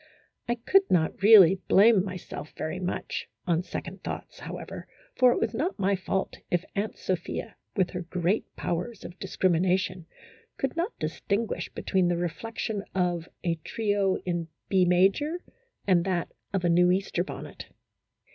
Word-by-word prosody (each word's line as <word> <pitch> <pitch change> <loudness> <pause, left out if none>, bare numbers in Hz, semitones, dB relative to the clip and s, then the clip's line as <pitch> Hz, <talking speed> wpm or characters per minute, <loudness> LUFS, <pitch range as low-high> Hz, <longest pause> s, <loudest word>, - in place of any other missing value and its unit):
I 240 - +2
could 385 +11 +3
not 165 0 +1
really 195 -3 +8
blame 205 -1 +6
myself 185 -5 -7
very 155 +4 -3
much, 180 -1 -3 0.2
on 170 -2 +2
second 180 +1 -6
thoughts, - - -6
however, - - -7 0.3
for 250 -1 +5
it - - +1
was 225 - 0
not 305 - -1
my 200 0 +2
fault 190 +1 -2
if 175 +1 0
Aunt 210 +2 -2
Sophia, 185 +5 -3 0.2
with 185 -3 +1
her 180 - -4
great 180 +4 0
powers 190 +6 -3
of 175 - -10
discrimina 185 -1 +2
tion, 185 -3 -5 0.5
could 270 +2 -2
not 345 +7 -2
distinguish 215 +2 -2
between 185 -2 0
the 175 0 +1
reflection 205 +4 -3
of 175 -2 0
a 165 -2 0
trio 205 -3 +1
in 170 -2 -1 0.2
B 190 -2 +4
major 195 - +2 0.4
and 180 -4 +4
that 180 -2 -1 0.2
of 190 -3 0
a - - +3
new 175 +1 +5
Easter 185 -1 +1
bonnet. - - -8
185 Hz, 155 wpm, -27 LUFS, 175-205 Hz, 0.5 s, really